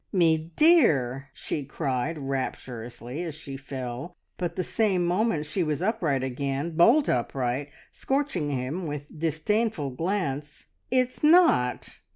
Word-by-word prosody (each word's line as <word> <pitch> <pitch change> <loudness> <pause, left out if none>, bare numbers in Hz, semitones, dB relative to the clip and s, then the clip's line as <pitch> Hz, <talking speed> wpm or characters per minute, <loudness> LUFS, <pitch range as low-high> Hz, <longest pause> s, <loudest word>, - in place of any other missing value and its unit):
"Me 165 -3 +2
dear!" 140 - +4
she 150 - -4
cried 135 +2 -2
rapturously, 125 -1 -4
as 165 -4 -4
she 140 -3 -8
fell, 135 +3 -6 0.2
but 175 -2 -3
the 185 - -1
same 180 0 +1
moment 175 -3 +1
she 165 +6 -2
was 155 -4 0
upright 175 - 0
again, 135 +4 -2
bolt 230 - +5
upright, 125 +2 -1 0.2
scorching 270 - -1
him 140 +6 -3
with 145 -1 -4
disdainful 165 - 0
glance. 150 -2 -3 0.2
"It's 255 0 +1
not! 305 - +4
155 Hz, 125 wpm, -27 LUFS, 135-185 Hz, 0.2 s, bolt